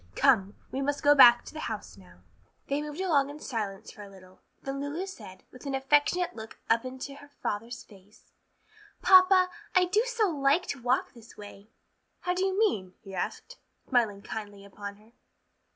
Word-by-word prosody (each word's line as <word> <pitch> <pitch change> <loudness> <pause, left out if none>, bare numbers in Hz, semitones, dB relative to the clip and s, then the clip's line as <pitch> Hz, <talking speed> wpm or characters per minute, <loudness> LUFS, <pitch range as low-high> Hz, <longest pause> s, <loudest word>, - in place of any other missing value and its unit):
"Come, 205 -7 +3 0.2
we 265 - -3
must 285 +1 -2
go 290 0 +7
back 240 -4 +7
to - - -11
the 310 - -7
house 205 - -6
now." 90 -2 -18 0.5
They 280 +1 0
moved 300 +2 -7
along 300 -7 +2
in 295 +1 -9
silence 210 -8 -5
for 210 - -13
a 200 - -10
little, 185 -1 -17 0.2
then 275 0 -4
Lulu 295 +6 -3
said, 190 - -11
with 255 +3 -11
an 275 - -1
affectionate 290 +6 +1
look 220 -1 -10
up 230 +2 +2
into 260 +2 -7
her 285 - -14 0.2
father's 230 +3 -4
face, 205 0 -20 0.7
"Papa, 370 0 +7 0.3
I 365 0 +5
do 415 +5 +2
so 465 -3 +1
like 290 +2 +2
to 280 - -4
walk 250 +2 0
this 230 -2 -16
way!" 205 0 -12 0.5
"How 360 - -1
do 370 +1 -1
you 385 0 0
mean?" 200 - 0
he 195 -2 -11
asked, - - -5 0.3
smiling 220 -6 +1
kindly 205 -2 -7
upon 200 0 -8
her. 215 +2 -22
260 Hz, 185 wpm, -28 LUFS, 205-300 Hz, 0.7 s, go